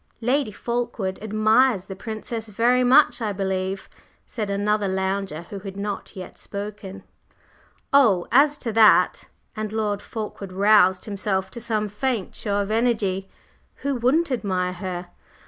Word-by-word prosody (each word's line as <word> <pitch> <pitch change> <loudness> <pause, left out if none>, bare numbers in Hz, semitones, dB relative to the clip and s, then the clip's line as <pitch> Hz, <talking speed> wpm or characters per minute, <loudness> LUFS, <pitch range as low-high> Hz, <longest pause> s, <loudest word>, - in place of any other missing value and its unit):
"Lady 255 0 +1
Fulkeward 235 -4 -3
admires 215 0 +3
the 190 - -7
Princess 220 +2 -6
very 240 +4 +2
much, 250 -1 +5
I 215 -2 -1
believe?" 190 0 -2 0.4
said 215 -4 -4
another 205 +1 0
lounger 190 -3 -2
who 200 - -5
had 195 0 -8
not 205 +1 -5
yet 185 -2 -9
spoken. 200 -1 -7 0.9
"Oh, 220 -11 +5
as 285 +4 +5
to 230 - -1
that!" 220 -1 +5 0.3
and 215 -1 -4
Lord 210 -2 -1
Fulkeward 205 -3 -7
roused 195 -2 +4
himself 190 -2 -2
to 235 - -6
some 215 -2 -1
faint 210 0 -2
show 205 -2 -2
of 200 +1 -3
energy. 215 -5 0 0.6
"Who 280 - +1
wouldn't 270 +6 +1
admire 185 -6 -1
her? 180 -1 -5
210 Hz, 140 wpm, -23 LUFS, 190-230 Hz, 0.9 s, much